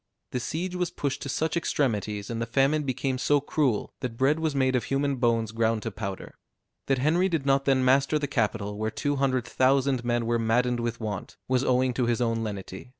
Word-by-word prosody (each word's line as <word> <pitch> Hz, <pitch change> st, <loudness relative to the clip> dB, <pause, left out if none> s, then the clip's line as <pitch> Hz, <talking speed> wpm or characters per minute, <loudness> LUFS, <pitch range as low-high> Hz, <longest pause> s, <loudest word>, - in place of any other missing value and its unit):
The 125 Hz, -, -1 dB
siege 170 Hz, +9 st, -3 dB
was 180 Hz, -2 st, -1 dB
pushed 140 Hz, -2 st, -3 dB
to 140 Hz, -, -5 dB
such 155 Hz, +4 st, -1 dB
extremities, 110 Hz, -10 st, -1 dB
and 115 Hz, 0 st, -3 dB
the 115 Hz, -, -2 dB
famine 135 Hz, +5 st, +2 dB
became 130 Hz, -1 st, -2 dB
so 145 Hz, +3 st, +3 dB
cruel, 140 Hz, -5 st, 0 dB
that 120 Hz, -2 st, -5 dB
bread 140 Hz, +5 st, +2 dB
was 160 Hz, -3 st, -1 dB
made 130 Hz, -1 st, +2 dB
of 125 Hz, -, 0 dB
human 140 Hz, 0 st, 0 dB
bones 115 Hz, -3 st, +1 dB
ground 115 Hz, -1 st, 0 dB
to 115 Hz, -, -3 dB
powder. 95 Hz, -1 st, -6 dB, 0.5 s
That 135 Hz, -, +2 dB
Henry 165 Hz, +8 st, +2 dB
did 160 Hz, -6 st, -1 dB
not 135 Hz, 0 st, +2 dB
then 130 Hz, -2 st, +3 dB
master 135 Hz, +3 st, +3 dB
the 150 Hz, -, -1 dB
capital, 105 Hz, -6 st, -1 dB
where 110 Hz, 0 st, 0 dB
two 145 Hz, +6 st, -2 dB
hundred 130 Hz, -3 st, +1 dB
thousand 130 Hz, 0 st, +2 dB
men 120 Hz, -1 st, 0 dB
were 115 Hz, 0 st, +1 dB
maddened 120 Hz, +2 st, +1 dB
with 115 Hz, -1 st, -3 dB
want, 105 Hz, -4 st, -5 dB
was 130 Hz, 0 st, +2 dB
owing 130 Hz, 0 st, +2 dB
to 120 Hz, -1 st, 0 dB
his 120 Hz, -1 st, +1 dB
own 115 Hz, -2 st, 0 dB
lenity. 100 Hz, 0 st, -6 dB
130 Hz, 210 wpm, -27 LUFS, 115-140 Hz, 0.5 s, so